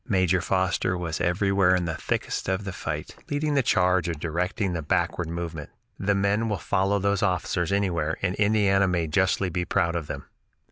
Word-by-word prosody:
Major 95 -4 +2
Foster 95 -1 0
was 85 -3 -3
everywhere 95 +1 +3
in 90 -1 0
the 85 - -2
thickest 80 - -2
of 95 +1 -1
the 100 - -4
fight, 75 -3 -5
leading 145 +1 0
the 140 - +4
charge 90 -5 +2
or 85 - -2
directing 90 +5 -2
the 85 - -2
backward 80 +2 0
movement. 85 -3 -5 0.3
The 100 +1 +1
men 100 +3 +1
will 105 - 0
follow 100 +1 +1
those 100 0 0
officers 90 -2 0
anywhere 85 -6 0
and 90 -2 +1
Indiana 100 -2 +3
may 90 -2 0
justly 95 +4 +1
be 90 +1 -1
proud 85 0 0
of 80 -3 -3
them." - - -6
95 Hz, 185 wpm, -26 LUFS, 85-100 Hz, 0.3 s, the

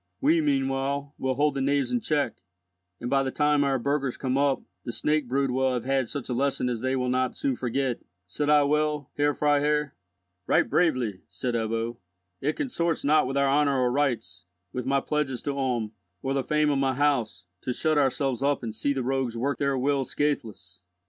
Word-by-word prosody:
We 160 +3 +3
meanwhile 140 0 0
will 130 0 0
hold 145 +2 +2
the 135 - -2
knaves 140 - +1
in 245 -1 0
check, 150 -8 0 0.6
and, 120 - -4
by 135 +2 +3
the 135 - -1
time 150 +1 +2
our 135 -1 +1
burghers 140 0 -1
come 130 -1 -1
up, 140 -1 +2 0.2
the 120 - -4
snake 150 +2 0
brood 135 +1 +1
will 130 0 +1
have 120 - -3
had 135 -3 +1
such 140 -4 -5
a 125 - -2
lesson 135 0 0
as 120 -2 -3
they 130 +1 0
will 125 -1 -1
not 130 0 0
soon 135 -2 0
forget. 125 0 -1 0.3
Said 145 +11 -2
I 150 -1 +6
well, 150 -1 0
Herr 145 0 +2
Freiherr?" 150 0 +2 0.5
"Right - - +3
bravely," 125 - +1
said 105 +9 -3
Ebbo. 115 +1 -1 0.4
"It 150 +3 0
consorts 170 - -1
not 150 -1 +4
with 135 +1 -2
our 140 0 +3
honour 140 0 +3
or 125 -1 +2
rights, 120 -11 -1 0.3
with 125 - -4
my 135 0 +2
pledges 150 -5 -2
to 140 - -2
Ulm, 125 -5 -1 0.3
or 135 - 0
the 135 -1 0
fame 150 +2 +2
of 140 - +1
my 135 -1 +1
house, 135 -9 0 0.2
to 130 - -2
shut 155 +4 +1
ourselves 135 -2 +1
up 140 -1 +1
and 110 -2 -4
see 140 +6 0
the 135 -2 -2
rogues 130 -2 -1
work 140 +4 -1
their 140 -1 +1
will 135 +1 +1
scatheless. 115 -11 -3
135 Hz, 200 wpm, -26 LUFS, 125-145 Hz, 0.6 s, I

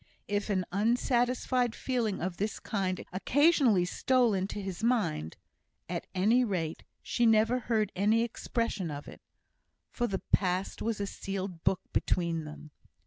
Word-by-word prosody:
If 205 +1 -1
an 185 -3 +1
unsatisfied 245 +3 +1
feeling 235 -6 -1
of 180 0 -3
this 210 +1 -2
kind 190 -4 -2
occasionally 250 - +4
stole 245 +4 +2
into 190 +2 -2
his 195 0 -5
mind, 205 - 0 0.5
at - - -4
any 220 +7 +4
rate 175 -8 -2 0.2
she 240 -1 +2
never 225 +3 +4
heard 215 -3 0
any 215 +4 +3
expression 230 -5 -2
of 145 -1 -6
it; - - -11 0.7
for 240 - -1
the 195 -3 -3
past 185 0 +1
was 225 -2 -1
a 200 - -1
sealed 195 -3 -5
book 190 -1 +2
between 170 -3 0
them. 150 0 -10
205 Hz, 140 wpm, -30 LUFS, 185-235 Hz, 0.7 s, occasionally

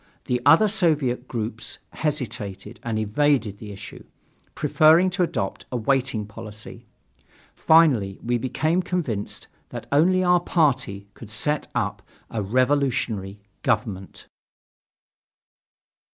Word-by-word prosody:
The 125 -1 -1
other 165 +8 +7
Soviet 155 - +1
groups 115 -1 -4
hesitated 110 -7 -4
and 115 -2 -3
evaded 110 -1 +1
the 105 -2 -8
issue, 100 0 -10 0.5
preferring 165 +4 +4
to 180 +1 -2
adopt 95 - -2
a 125 - -1
waiting 125 -2 0
policy. 110 0 -10 0.7
Finally 135 -12 +4
we 120 +1 0
became 155 +8 0
convinced 155 - -3 0.2
that - - -7
only 180 +6 +4
our 180 0 +4
party 135 - 0
could 115 - -12
set 145 +8 -1
up 105 -3 -1 0.3
a 115 - -2
revolutionary 115 -4 0 0.2
government. 105 -6 -2
125 Hz, 110 wpm, -24 LUFS, 105-150 Hz, 0.7 s, other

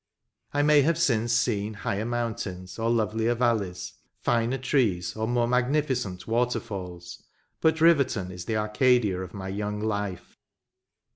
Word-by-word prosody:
I 145 0 +1
may 150 0 +6
have 160 +3 +2
since 120 -8 +1
seen 110 -3 0
higher 100 +1 -2
mountains 110 -6 -4
or 115 +1 0
lovelier 110 +1 +1
valleys, 110 -7 -1 0.2
finer 120 +2 0
trees 115 -9 0
or 110 0 -2
more 120 0 +1
magnificent 125 -7 0
waterfalls, 100 -7 -3 0.4
but 160 0 +2
Riverton 135 - +3
is 90 -1 -8
the 110 - -1
Arcadia 105 -2 +2
of 95 - -8
my 95 -1 -5
young 105 +1 -3
life. 105 -4 -4
110 Hz, 135 wpm, -26 LUFS, 100-125 Hz, 0.4 s, may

